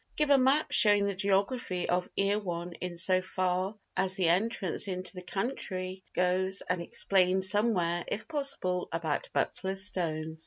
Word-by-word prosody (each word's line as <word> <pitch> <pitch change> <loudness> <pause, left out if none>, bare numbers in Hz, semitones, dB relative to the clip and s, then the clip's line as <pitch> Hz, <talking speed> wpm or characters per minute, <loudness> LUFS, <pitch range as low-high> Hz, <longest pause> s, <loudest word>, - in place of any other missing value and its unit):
Give 300 -1 +1
a 280 - +7
map 270 +4 +2
showing 205 -1 +5
the 200 - -1
geography 195 0 0
of 180 +1 0
Erewhon 185 -4 -1
in 180 -1 -5
so 185 +1 +4
far 185 +2 -2 0.2
as 190 0 0
the 185 -4 +1
entrance 190 0 0
into 185 -1 -3
the 180 - -8
country 185 -1 -4
goes, 185 +1 0
and 180 -1 -1
explain 185 +1 +2
somewhere, 190 -4 +2
if 210 - -4
possible, 275 - -1
about 165 -3 -2
Butler's 190 +1 -1
stones. 160 -4 -3
185 Hz, 150 wpm, -29 LUFS, 180-200 Hz, 0.2 s, a